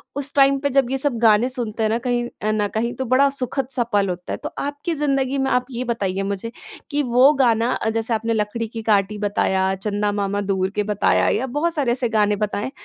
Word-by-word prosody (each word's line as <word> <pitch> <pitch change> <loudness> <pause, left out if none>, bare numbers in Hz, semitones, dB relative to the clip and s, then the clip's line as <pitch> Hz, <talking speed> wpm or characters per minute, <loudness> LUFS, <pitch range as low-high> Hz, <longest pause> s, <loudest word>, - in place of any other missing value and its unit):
उस, 280 0 -4
टाइम 275 0 +5
पर 285 +1 0
जब 255 -3 0
ये 270 - 0
सब 270 -2 0
गाने 225 +1 +4
सुनते 230 -4 -3
हैं 215 - +2
ना 225 - +1
कहीं 240 -1 0 0.2
अ, 215 - 0
न 210 -1 0
कहीं 235 +2 -1
तो 260 - -3
बड़ा 280 +2 +5
सुखद 255 +1 -2
सा 245 - +2
पल 200 -1 +2
होता 180 0 -5
है। - - -3
तो - - -3
आपकी 285 +4 -3
ज़िंदगी 275 -2 0
में 270 0 0
आप 250 0 +1
ये 245 0 -3
बताइए 195 -3 -2
मुझे 215 +4 -6 0.4
कि 290 0 +1
वो 255 +4 +7
गाना 230 0 +2
अ, - - -1
जैसे 225 +1 -1
आपने 225 +1 -1
लकड़ी 220 +1 -2
की 225 +1 -7
काटी 205 0 +2
बताया, 190 -2 0
चंदा 205 +1 -1
मामा 205 0 -1
दूर 190 -1 -1
के 210 - +1
बताया 205 - +2
या 260 - -2
बहुत 340 +2 +1
सारे 275 -6 +1
ऐसे 240 -1 -1
गाने 210 -2 +2
बताए। 205 +4 -4
230 Hz, 235 wpm, -21 LUFS, 210-265 Hz, 0.4 s, वो